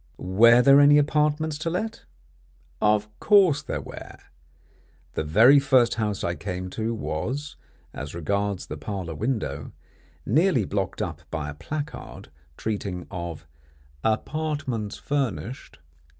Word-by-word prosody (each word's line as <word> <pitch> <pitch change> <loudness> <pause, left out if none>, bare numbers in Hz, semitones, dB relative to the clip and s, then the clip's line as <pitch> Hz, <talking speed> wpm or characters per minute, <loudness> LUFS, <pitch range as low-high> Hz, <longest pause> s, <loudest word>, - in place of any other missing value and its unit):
"Were 115 +6 +5
there 140 +1 +7
any 145 +1 +7
apartments 150 +1 +1
to 165 - -2
let?" 220 +6 -4 0.8
Of 105 0 +3
course 190 -9 +5
there 155 - -4
were. - - -10 1.0
The - - -2
very 115 - +6
first 130 -4 +3
house 105 -4 -2
I 85 - 0
came 90 0 -5
to 115 +2 -2
was, 125 - -4 0.4
as 70 +3 -7
regards 100 +3 -1
the 75 - -7
parlour 90 0 -5
window, 90 - -3 0.5
nearly 145 - +3
blocked 95 -1 -2
up - - -5
by 75 -2 -4
a - - -8
placard 145 - -7 0.3
treating 100 -5 -3
of 85 -3 -6 0.6
"Apartments 130 -2 -2
Furnished." 130 - -3
110 Hz, 120 wpm, -25 LUFS, 95-145 Hz, 1.0 s, there